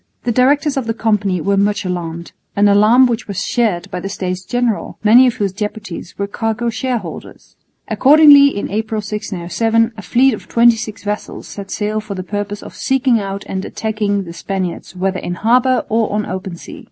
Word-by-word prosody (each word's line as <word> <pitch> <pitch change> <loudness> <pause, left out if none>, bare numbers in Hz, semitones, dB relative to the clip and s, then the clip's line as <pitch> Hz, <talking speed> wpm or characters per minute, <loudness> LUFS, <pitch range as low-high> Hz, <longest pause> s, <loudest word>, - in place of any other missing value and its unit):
The 240 - 0
directors 275 +4 +2
of 255 -4 -2
the 225 - -1
Company 205 -6 0
were 200 +4 +1
much 205 0 +1
alarmed, 170 -2 -4 0.2
an 205 +1 +4
alarm 215 +6 +5
which 240 -1 -2
was 200 -2 -3
shared 220 -8 -1
by 180 - -3
the 195 - -5
States 185 -1 -4
General, 245 0 -2
many 240 +5 +7
of 245 - 0
whose 200 -6 -2
deputies 210 -4 -6
were 200 - -1
cargo 225 +3 -2
shareholders. 230 -7 -5 0.3
Accordingly, 285 0 +7
in 205 -8 -2
April, 220 +1 -2
1607, 210 +2 -1
a 210 - -8
fleet 255 +5 +3
of 215 - -8
twenty 235 0 +4
six 220 -1 -7
vessels 210 0 -5
set 200 -1 -8
sail 210 +1 -2
for 210 -2 -6
the 185 - -5
purpose 205 +1 -4
of - - -10
seeking 260 -3 +1
out 195 0 -5
and 190 0 -4
attacking 210 -2 -2
the 170 -2 -9
Spaniards 185 0 -4
whether 185 +1 -1
in 175 - -4
harbour 250 +5 +2
or 225 0 0
on 210 +1 0
the - - -6
open 185 -1 -5
sea. - - -11
210 Hz, 190 wpm, -17 LUFS, 195-235 Hz, 0.3 s, many